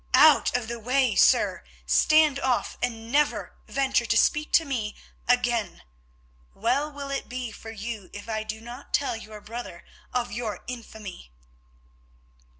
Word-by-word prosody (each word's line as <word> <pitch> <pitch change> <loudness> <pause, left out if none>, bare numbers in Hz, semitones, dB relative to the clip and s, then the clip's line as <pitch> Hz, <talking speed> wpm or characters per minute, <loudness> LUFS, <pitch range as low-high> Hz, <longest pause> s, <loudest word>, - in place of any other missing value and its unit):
Out 305 -5 +6
of 240 -3 -5
the 235 0 -5
way, 250 +1 +2
sir! - - +4 0.2
Stand 310 -3 +4
off, 260 -3 0
and 230 -2 -3
never 295 +2 +1
venture 270 -3 +1
to 230 - +3
speak 300 +5 +2
to 325 - +5
me 230 -7 -3 0.3
again. 240 -5 +1 0.7
Well 260 +8 +1
will 280 -1 -6
it 275 - -3
be 250 -2 -4
for 225 - -10
you 220 -2 -6
if 205 +2 -9
I 220 -1 -1
do 215 0 -5
not 240 +4 -4
tell 280 -4 0
your 215 -1 -9
brother 220 -6 -8 0.3
of 245 -1 -1
your 215 -3 -4
infamy." 220 - -8
240 Hz, 150 wpm, -26 LUFS, 220-270 Hz, 0.7 s, Out